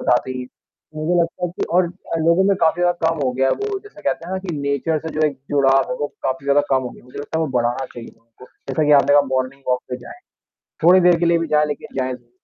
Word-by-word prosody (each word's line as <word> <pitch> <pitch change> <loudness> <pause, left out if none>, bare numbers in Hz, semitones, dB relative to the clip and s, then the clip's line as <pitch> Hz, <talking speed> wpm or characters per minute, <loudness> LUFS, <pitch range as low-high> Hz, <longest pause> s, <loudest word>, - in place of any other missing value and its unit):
बताते 125 +1 +1
ही 130 0 -4
हैं। 125 - -8 0.5
मुझे 155 +3 0
लगता 170 +2 -2
है - - -7
कि 175 - -3
और 180 0 +5
अ, 175 -2 -6
लोगों 170 +4 +3
में 195 -1 +3
काफ़ी 165 0 +2
ज़्यादा 175 -2 +2
कम 165 0 -1
हो 130 - +1
गया 130 +1 +1
है - - +2
वो 410 -1 -2
जैसे 415 - -15
कहते 140 +3 -2
हैं 185 - -6
ना 190 - -1
कि 185 -3 -5
नेचर 140 +3 -1
से - - -2
जो 155 - +4
एक 145 - -3
जुड़ाव 135 -2 +3
है - - -1
वो 145 - 0 0.2
काफ़ी 130 +1 -2
ज़्यादा 140 +1 +4
कम 130 -1 +3
हो 125 - -4
गया - - -15
है। - - -22
मुझे 125 - -11
लगता 145 +3 -4
है 160 - +1
वो 150 - -4
बढ़ाना 120 +2 -1
चाहिए 120 -1 -8
उनको 115 +2 -18 0.2
जैसा 155 - 0
कि 150 - +2
आपने 145 +1 +2
कहा 145 - +7
मॉर्निंग 130 +1 -2
वॉक 125 0 +2
पे 125 - -2
जाएँ। 360 - -12 0.6
थोड़ी 185 +2 +7
देर 175 -1 +5
के 170 - +2
लिए 170 0 +3
भी 165 - -2
जाएँ, 150 0 +3
लेकिन 145 - -5
जाएँ 130 0 -1
ज़रूर, 120 -1 -16
150 Hz, 290 wpm, -20 LUFS, 130-170 Hz, 0.6 s, कहा